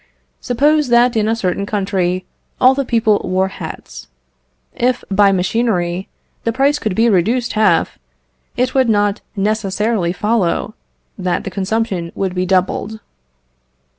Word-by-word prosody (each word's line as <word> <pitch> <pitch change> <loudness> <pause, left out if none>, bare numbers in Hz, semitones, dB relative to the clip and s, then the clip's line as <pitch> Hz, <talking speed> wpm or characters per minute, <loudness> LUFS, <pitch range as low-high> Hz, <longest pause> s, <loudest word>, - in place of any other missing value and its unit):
Suppose 295 +4 +2
that 240 0 +4
in 215 -1 +1
a 225 - +1
certain 200 -2 -2
country 185 -3 -1 0.3
all 255 +1 +6
the 275 +1 -1
people 225 -4 +2
wore 185 +1 0
hats. - - -9 0.7
If, 245 +1 0
by 200 0 +4
machinery, 185 -2 0 0.4
the 230 - 0
price 275 +4 +1
could 215 -8 -2
be 225 +3 +3
reduced 230 +5 +1
half, 215 -6 +2 0.6
it 255 +1 0
would 260 -3 +2
not 205 -1 +1
necessarily 210 -2 0
follow 210 0 0 0.5
that 180 -1 -1
the 195 - -5
consumption 195 -3 -2
would 190 -2 -2
be 180 0 -1
doubled. 190 +3 0
210 Hz, 135 wpm, -17 LUFS, 185-235 Hz, 0.7 s, all